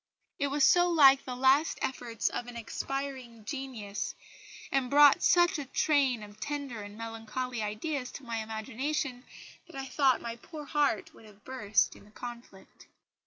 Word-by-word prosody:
It 285 Hz, -, +1 dB
was 285 Hz, +1 st, +1 dB
so 355 Hz, +3 st, +6 dB
like 275 Hz, -5 st, +6 dB
the 250 Hz, -, -4 dB
last 265 Hz, +5 st, +3 dB
efforts 240 Hz, -4 st, -2 dB
of 245 Hz, -, -3 dB
an 245 Hz, -, -9 dB
expiring 255 Hz, -1 st, -5 dB
genius, 245 Hz, -7 st, -5 dB, 0.6 s
and 265 Hz, -2 st, +1 dB
brought 290 Hz, 0 st, +7 dB
such 350 Hz, -1 st, +4 dB
a 285 Hz, -, -4 dB
train 265 Hz, -5 st, +2 dB
of 205 Hz, 0 st, -13 dB
tender 280 Hz, -4 st, -4 dB
and 205 Hz, +1 st, -9 dB
melancholy 230 Hz, +2 st, -4 dB
ideas 250 Hz, +6 st, -3 dB
to 280 Hz, -, -8 dB
my 235 Hz, -2 st, -4 dB
imagination, 245 Hz, +5 st, -3 dB, 0.4 s
that -, -, -14 dB
I 270 Hz, 0 st, -4 dB
thought 265 Hz, -1 st, +3 dB
my 235 Hz, 0 st, -6 dB
poor 300 Hz, +4 st, -9 dB
heart 285 Hz, -7 st, 0 dB
would 225 Hz, -, -16 dB
have 210 Hz, -1 st, -18 dB
burst 250 Hz, -6 st, +1 dB
in -, -, -16 dB
the -, -, -18 dB
conflict." 235 Hz, -3 st, -11 dB
255 Hz, 165 wpm, -30 LUFS, 225-280 Hz, 0.6 s, brought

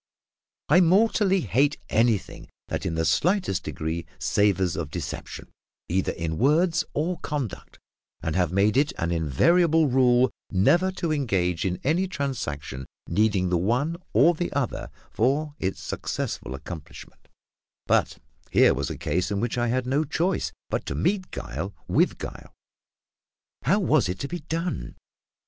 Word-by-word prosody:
I 175 Hz, +6 st, +6 dB
mortally 195 Hz, +1 st, +3 dB
hate 135 Hz, -, +2 dB
anything 115 Hz, -3 st, 0 dB, 0.2 s
that -, -, -2 dB
in 80 Hz, -, -2 dB
the 80 Hz, 0 st, 0 dB
slightest 180 Hz, -, +1 dB
degree 80 Hz, +2 st, -4 dB
savours 95 Hz, -4 st, +1 dB
of 80 Hz, -4 st, -3 dB
deception, -, -, -6 dB, 0.4 s
either 95 Hz, +2 st, +1 dB
in 80 Hz, -1 st, -3 dB
words 160 Hz, +4 st, +3 dB
or 170 Hz, +4 st, -1 dB
conduct, 140 Hz, -, -5 dB, 0.5 s
and 80 Hz, -, -2 dB
have 90 Hz, -3 st, +1 dB
made 100 Hz, +5 st, +2 dB
it 145 Hz, +1 st, +2 dB
an 85 Hz, 0 st, -1 dB
invariable 160 Hz, -, +3 dB
rule 125 Hz, -1 st, +4 dB, 0.2 s
never 155 Hz, -, +3 dB
to 170 Hz, -3 st, -2 dB
engage 95 Hz, -, 0 dB
in 90 Hz, -1 st, -1 dB
any 170 Hz, +7 st, +1 dB
transaction 75 Hz, -, -4 dB, 0.2 s
needing 100 Hz, -4 st, +1 dB
the 90 Hz, -1 st, +2 dB
one 125 Hz, -, 0 dB, 0.2 s
or 170 Hz, -, +5 dB
the 175 Hz, +2 st, -3 dB
other 140 Hz, -3 st, -2 dB, 0.2 s
for 145 Hz, +6 st, +1 dB
its 95 Hz, 0 st, -2 dB
successful -, -, -4 dB
accomplishment; 80 Hz, -5 st, -10 dB, 0.6 s
but -, -, +2 dB, 0.3 s
here -, -, +5 dB
was 70 Hz, +1 st, -2 dB
a -, -, -5 dB
case 90 Hz, +6 st, -1 dB
in 100 Hz, -1 st, -1 dB
which 120 Hz, +2 st, -1 dB
I 120 Hz, 0 st, 0 dB
had 125 Hz, +2 st, 0 dB
no 140 Hz, +4 st, +1 dB
choice 165 Hz, +5 st, -1 dB, 0.2 s
but -, -, -1 dB
to -, -, -3 dB
meet 185 Hz, -1 st, 0 dB
guile 85 Hz, +11 st, -5 dB
with -, -, +2 dB
guile. -, -, -8 dB, 1.1 s
How 185 Hz, -, +2 dB
was 155 Hz, -, +2 dB
it 90 Hz, -, -2 dB
to 140 Hz, -, -2 dB
be 175 Hz, +4 st, -5 dB
done? 165 Hz, -, -4 dB
125 Hz, 150 wpm, -25 LUFS, -, 1.1 s, I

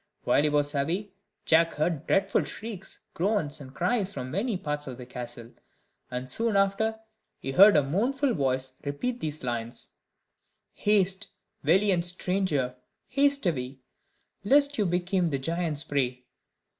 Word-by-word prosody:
While -, -, +3 dB
he 150 Hz, -, +2 dB
was 145 Hz, 0 st, +1 dB
away, 170 Hz, +9 st, -1 dB, 0.3 s
Jack 165 Hz, +1 st, +4 dB
heard 155 Hz, 0 st, -1 dB
dreadful 195 Hz, -, +2 dB
shrieks, 205 Hz, -4 st, -8 dB
groans, 175 Hz, -6 st, -1 dB
and 130 Hz, -2 st, -10 dB
cries 200 Hz, -, 0 dB
from 130 Hz, -5 st, -6 dB
many 205 Hz, +4 st, -1 dB
parts 150 Hz, -4 st, -4 dB
of 125 Hz, -2 st, -6 dB
the 125 Hz, -, -9 dB
castle; 120 Hz, -1 st, -8 dB, 0.6 s
and 125 Hz, 0 st, -4 dB
soon 225 Hz, -, -1 dB
after 200 Hz, +3 st, +1 dB, 0.4 s
he 135 Hz, -, -5 dB
heard 200 Hz, +8 st, +8 dB
a 145 Hz, -, +4 dB
mournful 245 Hz, -, 0 dB
voice 130 Hz, -4 st, -1 dB
repeat 235 Hz, +13 st, -3 dB
these 155 Hz, -2 st, -4 dB
lines: 120 Hz, -1 st, -3 dB, 0.8 s
"Haste, 195 Hz, -2 st, +2 dB, 0.3 s
valiant 180 Hz, +3 st, +3 dB
stranger, 175 Hz, -8 st, 0 dB, 0.3 s
haste 280 Hz, -1 st, +3 dB
away, 130 Hz, -6 st, -1 dB, 0.7 s
Lest 285 Hz, +6 st, +4 dB
you 205 Hz, -, +2 dB
become 180 Hz, +1 st, +1 dB
the 140 Hz, -4 st, -1 dB
giant's 160 Hz, +1 st, -1 dB
prey. 125 Hz, -3 st, -2 dB
170 Hz, 140 wpm, -27 LUFS, 135-200 Hz, 0.8 s, heard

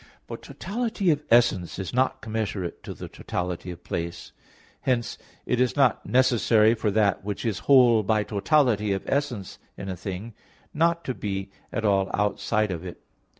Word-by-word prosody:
But -, -, -8 dB
totality 215 Hz, -3 st, -1 dB
of 150 Hz, -1 st, 0 dB
essence 115 Hz, -7 st, +3 dB
is 95 Hz, +2 st, -5 dB
not 130 Hz, +1 st, +1 dB
commensurate 110 Hz, -5 st, -3 dB
to -, -, -6 dB
the -, -, -8 dB
totality 90 Hz, 0 st, -4 dB
of 90 Hz, -1 st, -9 dB
place. 85 Hz, 0 st, -5 dB, 0.5 s
Hence 120 Hz, -2 st, -1 dB, 0.3 s
it 125 Hz, 0 st, +1 dB
is 125 Hz, -, +1 dB
not 135 Hz, -5 st, +3 dB
necessary 115 Hz, -3 st, +4 dB
for 110 Hz, -2 st, -1 dB
that 100 Hz, -2 st, +2 dB
which 100 Hz, +2 st, -4 dB
is 110 Hz, -5 st, -1 dB
whole 125 Hz, -5 st, +7 dB
by 105 Hz, +1 st, +1 dB
totality 105 Hz, -1 st, +2 dB
of 95 Hz, -, -4 dB
essence 130 Hz, -9 st, -2 dB, 0.2 s
in 100 Hz, -, -6 dB
a 95 Hz, -, -3 dB
thing, 95 Hz, +5 st, -6 dB, 0.4 s
not 170 Hz, +2 st, +2 dB
to 130 Hz, -, -1 dB
be 95 Hz, -3 st, -4 dB, 0.2 s
at 110 Hz, -, -2 dB
all 100 Hz, -2 st, +2 dB
outside 105 Hz, +1 st, 0 dB
of 85 Hz, -1 st, -5 dB
it. 90 Hz, -2 st, -9 dB
110 Hz, 165 wpm, -25 LUFS, 95-125 Hz, 0.5 s, whole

